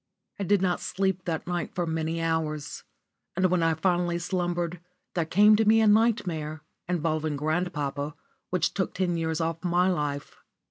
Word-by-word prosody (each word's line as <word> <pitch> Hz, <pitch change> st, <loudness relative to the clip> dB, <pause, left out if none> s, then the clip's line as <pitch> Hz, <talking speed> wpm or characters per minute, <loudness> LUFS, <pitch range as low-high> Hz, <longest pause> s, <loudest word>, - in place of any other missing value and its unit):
*_ -, -, -57 dB, 0.4 s
I -, -, -4 dB
did 200 Hz, -2 st, +3 dB
not 180 Hz, -1 st, +1 dB
sleep 190 Hz, -1 st, -1 dB
that 160 Hz, -2 st, -2 dB
night 175 Hz, 0 st, -3 dB
for 175 Hz, -, 0 dB
many 160 Hz, 0 st, -2 dB
hours, 155 Hz, -2 st, -2 dB, 0.5 s
and 185 Hz, +1 st, +2 dB
when 180 Hz, -2 st, +2 dB
I 165 Hz, -1 st, +2 dB
finally 175 Hz, +1 st, +1 dB
slumbered 175 Hz, -1 st, -2 dB, 0.3 s
there 170 Hz, -3 st, 0 dB
came 210 Hz, +5 st, +6 dB
to 220 Hz, -, +2 dB
me 220 Hz, +1 st, +5 dB
a 220 Hz, -, +4 dB
nightmare, 185 Hz, -9 st, +2 dB, 0.3 s
involving 155 Hz, -3 st, 0 dB
grandpapa, 150 Hz, -2 st, -2 dB, 0.3 s
which 180 Hz, -2 st, 0 dB
took 190 Hz, -, -2 dB
ten 180 Hz, -2 st, 0 dB
years 160 Hz, -1 st, -1 dB
off 165 Hz, 0 st, -2 dB
my 180 Hz, +1 st, +3 dB
life. 145 Hz, -4 st, -3 dB
175 Hz, 170 wpm, -27 LUFS, 160-185 Hz, 0.5 s, came